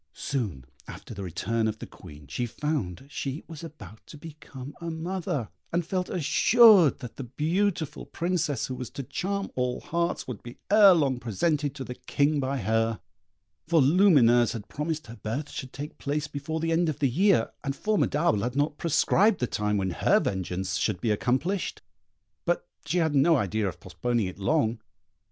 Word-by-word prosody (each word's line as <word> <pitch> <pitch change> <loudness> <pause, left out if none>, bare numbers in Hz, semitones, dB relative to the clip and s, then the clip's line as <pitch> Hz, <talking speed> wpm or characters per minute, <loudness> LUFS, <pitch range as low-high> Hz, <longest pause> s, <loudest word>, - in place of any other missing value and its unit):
Soon 105 - -3 0.2
after - - -9
the 100 - -7
return 110 +5 -1
of 110 0 -2
the - - -7
Queen 75 0 -13
she 70 - -3
found 125 - -3
she 140 +1 -5
was 165 -1 -9
about 150 -9 -11
to 150 - -11
become 145 -3 -10
a 170 - -4
mother, 160 - -3 0.2
and 170 0 0
felt 180 +1 -2
assured 190 - +6
that 125 - -8
the 135 - -4
beautiful 160 - -1
Princess 170 -5 -1
who 130 - -5
was 125 -2 -6
to 140 - -6
charm 200 +9 -3
all 125 -1 -1
hearts 170 -1 -2
would 125 -6 -6
be 120 0 -10
ere 205 -3 +8
long 135 -6 +1
presented 145 - -1
to 135 - -5
the 125 - -6
King 145 +3 0
by 135 0 -1
her, 115 -2 0 0.7
for 165 0 +4
Lumineuse 135 - +5
had 115 -3 -7
promised 155 +1 -3
her 115 +1 -10
birth 135 +7 -4
should 130 -2 -6
take 145 +2 -8
place 145 +1 -2
before 150 +2 -4
the 165 +1 -1
end 165 0 +2
of 150 - -3
the 145 -3 +2
year, 170 - +3
and 135 -1 -2
Formidable 165 - +1
had 120 +3 -2
not 145 +1 0
prescribed 190 +6 +3
the 125 - +1
time 105 -3 -1
when 95 -2 -1
her - - +3
vengeance 90 -1 -2
should 105 -5 0
be 110 - 0
accomplished; 135 - -1 0.6
but 175 - 0 0.2
she 165 +5 0
had 160 -3 +2
no 150 +4 +5
idea 105 - 0
of 90 - -6
postponing 115 +5 -1
it 90 +1 -7
long. 115 -1 +1
140 Hz, 180 wpm, -27 LUFS, 115-165 Hz, 0.7 s, ere